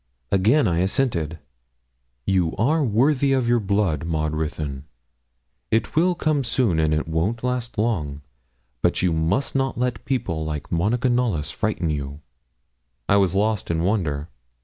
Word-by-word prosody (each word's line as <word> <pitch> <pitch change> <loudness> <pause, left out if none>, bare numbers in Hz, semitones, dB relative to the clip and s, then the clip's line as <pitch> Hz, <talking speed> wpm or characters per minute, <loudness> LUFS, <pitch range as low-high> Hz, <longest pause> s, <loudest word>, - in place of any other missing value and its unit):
Again 110 +10 +4
I 85 -1 +1
assented. 90 - 0 0.9
'You 90 -4 +1
are 150 +8 +2
worthy 135 +4 +2
of 130 -3 +1
your 120 0 +3
blood, 100 -7 0
Maud 80 -2 -1
Ruthyn. 75 -3 -3 0.8
It 115 +5 0
will 175 +3 +3
come 155 -4 +1
soon, 115 -8 +1
and 80 -1 +2
it 75 0 0
won't 90 +9 -1
last 125 -1 -2
long. 80 -11 -1 0.6
But - - +1
you 90 -3 +2
must 80 - 0
not 135 -1 0
let 125 0 -1
people 100 -12 -2
like 75 -1 -5
Monica 110 +9 +1
Knollys 115 - 0
frighten 95 -7 -1
you.' 70 -1 -4 0.9
I 100 - +4
was 95 -2 +2
lost 105 +1 0
in 85 0 0
wonder. 85 -7 0
100 Hz, 150 wpm, -23 LUFS, 80-125 Hz, 0.9 s, Again